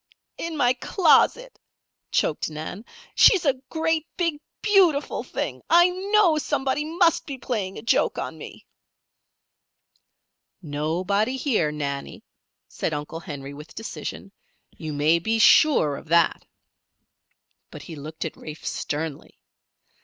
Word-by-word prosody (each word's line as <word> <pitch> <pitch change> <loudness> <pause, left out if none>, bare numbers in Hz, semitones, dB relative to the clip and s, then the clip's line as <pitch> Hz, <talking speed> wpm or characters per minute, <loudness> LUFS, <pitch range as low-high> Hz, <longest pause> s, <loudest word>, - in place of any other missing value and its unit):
"In 330 -1 -4
my 245 -2 +3
closet," 385 - +2 0.5
choked - - 0
Nan. 160 +7 -7 0.3
"She's 380 -5 +6
a 275 - +4 0.2
great, 320 -1 0
big, 335 -5 -1 0.2
beautiful 365 -9 +3
thing! - - -4
I 345 +1 +6
know 380 -3 +2
somebody 270 0 -1
must 330 +2 +1
be 275 -2 -5
playing 210 -7 -3
a - - -8
joke 230 - +1
on - - -4
me." - - -11 1.9
"Nobody 180 - -1
here, 225 - +1
Nannie," 140 -2 -5 0.4
said 155 - -3
Uncle 150 +2 -5
Henry, 145 -5 -8
with 150 +2 -12
decision. 225 -2 -7 0.4
"You 155 -2 -6
may 150 +3 +2
be 220 +6 0
sure 225 - +5
of - - -12
that." 170 +1 +2 1.2
But - - -10
he 165 - -9
looked 155 +3 -7
at 160 - -5
Rafe 155 0 -10
sternly. 150 -1 -4
220 Hz, 125 wpm, -24 LUFS, -, 1.9 s, She's